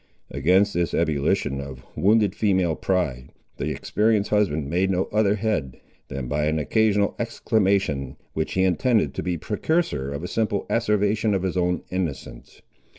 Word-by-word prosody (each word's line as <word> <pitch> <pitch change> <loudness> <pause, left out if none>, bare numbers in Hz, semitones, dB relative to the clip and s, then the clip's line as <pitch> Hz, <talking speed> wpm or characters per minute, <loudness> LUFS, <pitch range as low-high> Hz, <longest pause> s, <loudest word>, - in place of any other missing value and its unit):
Against 95 +9 +3
this 85 -1 0
ebullition 70 -3 0
of 65 -2 -9
wounded 105 0 +3
female 95 -6 +1
pride, 70 -11 -1 0.3
the - - -2
experienced 105 -1 0
husband 85 -9 +1
made 90 +5 +1
no 95 -1 +1
other 105 -1 +3
head, 100 - -2 0.3
than 70 -2 -5
by 75 +3 0
an 80 +1 +1
occasional 105 +5 +2
exclamation, 100 - 0 0.2
which 80 - -2
he 95 - +2
intended 95 - +2
to - - -3
be 90 -1 -2
precursor 105 - -1
of 70 +3 -5
a - - -3
simple 105 -2 -1
asseveration 105 -1 +1
of 95 - -1
his 95 -1 -1
own 90 -1 0
innocence. 80 -9 -5
95 Hz, 150 wpm, -24 LUFS, 75-105 Hz, 0.3 s, Against